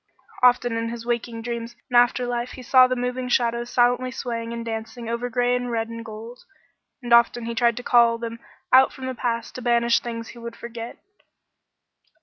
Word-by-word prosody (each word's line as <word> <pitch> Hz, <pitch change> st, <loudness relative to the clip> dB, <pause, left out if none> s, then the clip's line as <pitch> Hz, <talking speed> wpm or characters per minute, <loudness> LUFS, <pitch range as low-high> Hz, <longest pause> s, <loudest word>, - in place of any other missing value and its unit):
Often 245 Hz, -2 st, +4 dB
in 230 Hz, 0 st, -2 dB
his 230 Hz, 0 st, -7 dB
waking 235 Hz, -1 st, -3 dB
dreams 235 Hz, 0 st, -5 dB, 0.2 s
in -, -, -1 dB
after 245 Hz, +1 st, +4 dB
life 240 Hz, 0 st, -3 dB
he 255 Hz, -, -10 dB
saw 255 Hz, +1 st, +6 dB
the 255 Hz, -, -1 dB
moving 250 Hz, +1 st, -3 dB
shadows 240 Hz, -1 st, +1 dB
silently 245 Hz, +1 st, +2 dB
swaying 230 Hz, -2 st, -4 dB
and 235 Hz, 0 st, -5 dB
dancing 225 Hz, +1 st, -6 dB
over 235 Hz, +2 st, -2 dB
gray 245 Hz, 0 st, +1 dB
and 245 Hz, 0 st, -2 dB
red 225 Hz, -1 st, -2 dB
and 230 Hz, 0 st, -7 dB
gold, 230 Hz, +2 st, -9 dB, 0.6 s
and 240 Hz, -1 st, 0 dB
often 235 Hz, 0 st, +4 dB
he 235 Hz, -, -3 dB
tried 235 Hz, 0 st, +2 dB
to 245 Hz, -, -5 dB
call 235 Hz, -2 st, +4 dB
them 230 Hz, 0 st, -6 dB, 0.3 s
out 260 Hz, +1 st, +7 dB
from 260 Hz, -, -8 dB
the 260 Hz, -, -3 dB
past 235 Hz, -2 st, -3 dB
to 255 Hz, -, -7 dB
banish 235 Hz, -1 st, +3 dB
things 230 Hz, -1 st, -6 dB
he 240 Hz, -, -11 dB
would 235 Hz, 0 st, -8 dB
forget. 235 Hz, 0 st, -8 dB
235 Hz, 195 wpm, -23 LUFS, 230-245 Hz, 0.6 s, out